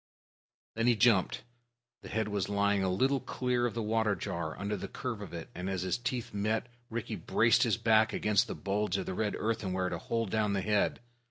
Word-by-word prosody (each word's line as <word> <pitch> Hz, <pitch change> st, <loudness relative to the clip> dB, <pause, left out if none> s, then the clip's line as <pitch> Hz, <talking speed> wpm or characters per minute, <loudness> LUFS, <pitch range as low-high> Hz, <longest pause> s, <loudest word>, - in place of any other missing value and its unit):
Then 115 Hz, +1 st, 0 dB
he 120 Hz, -, +5 dB
jumped. 105 Hz, -3 st, +3 dB, 0.6 s
The -, -, -10 dB
head 110 Hz, 0 st, -1 dB
was 100 Hz, -2 st, -2 dB
lying 100 Hz, -1 st, +2 dB
a 95 Hz, -, +1 dB
little 130 Hz, +9 st, +2 dB
clear 125 Hz, -2 st, 0 dB
of 115 Hz, -, -6 dB
the 115 Hz, -, -1 dB
water 110 Hz, -1 st, +1 dB
jar, 85 Hz, -2 st, -4 dB
under 100 Hz, +1 st, -2 dB
the 95 Hz, -, -5 dB
curve 120 Hz, -5 st, -5 dB
of 100 Hz, -, -7 dB
it; 85 Hz, -1 st, -7 dB
and, 90 Hz, +2 st, -4 dB
as 95 Hz, -2 st, -2 dB
his 95 Hz, +4 st, -1 dB
teeth 125 Hz, -1 st, -3 dB
met, 110 Hz, +2 st, 0 dB, 0.2 s
Rikki 115 Hz, -2 st, -3 dB
braced -, -, +3 dB
his -, -, +3 dB
back 110 Hz, -1 st, +4 dB
against 105 Hz, +2 st, +2 dB
the -, -, -4 dB
bulge 100 Hz, -1 st, -1 dB
of -, -, -3 dB
the -, -, -3 dB
red 105 Hz, +2 st, -1 dB
earthenware 95 Hz, -5 st, -1 dB
to 85 Hz, -, -3 dB
hold 115 Hz, -1 st, -2 dB
down 105 Hz, -2 st, +1 dB
the 100 Hz, -, 0 dB
head. 105 Hz, +3 st, +1 dB
105 Hz, 210 wpm, -31 LUFS, 95-115 Hz, 0.6 s, he